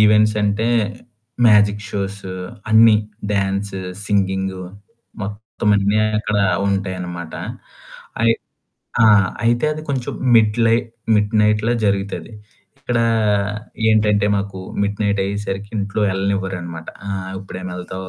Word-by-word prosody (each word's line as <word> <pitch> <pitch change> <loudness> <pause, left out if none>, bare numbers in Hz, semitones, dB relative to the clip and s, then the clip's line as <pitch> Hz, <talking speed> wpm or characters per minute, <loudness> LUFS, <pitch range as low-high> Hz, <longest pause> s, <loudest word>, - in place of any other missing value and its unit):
Events 105 0 +5
అంటే 105 +2 +1 0.8
magic 105 -1 +4
shows 100 0 -4 0.5
అన్నీ 110 0 +7 0.4
dance, 100 -1 -1 0.2
singing 95 -2 0 0.6
మొత్తం 105 +2 -4
అన్నీ 100 +2 +2 0.2
అక్కడ 105 -1 -1 0.3
ఉంటాయనమాట, 90 -4 -3 0.9
అయి 115 0 +5 0.7
ఆ! - - +7 0.4
అయితే 120 +3 +2
అది 155 0 -6
కొంచెం 130 -3 -2 0.2
మిడ్ 110 -1 +4
లైట్ 115 +1 +2 0.3
మిడ్ 105 +1 +1
నైట్‌లో 105 +2 +2
జరుగుతది. 100 +2 -1 0.5
ఇక్కడ 125 -3 -1 0.9
ఏంటంటే 105 -2 +3
మాకు 100 -1 -4 0.2
మిడ్ 100 0 -1
నైట్ 100 -1 +1
అయ్యేసరికి 100 0 -4
ఇంట్లో 100 +1 -1
ఎళ్ళనివ్వరనమాట, 95 -4 -3 0.2
''ఆ! - - -2 0.3
ఇప్పుడేమెళ్తావు. 95 0 -7
100 Hz, 105 wpm, -20 LUFS, 95-105 Hz, 0.9 s, అన్నీ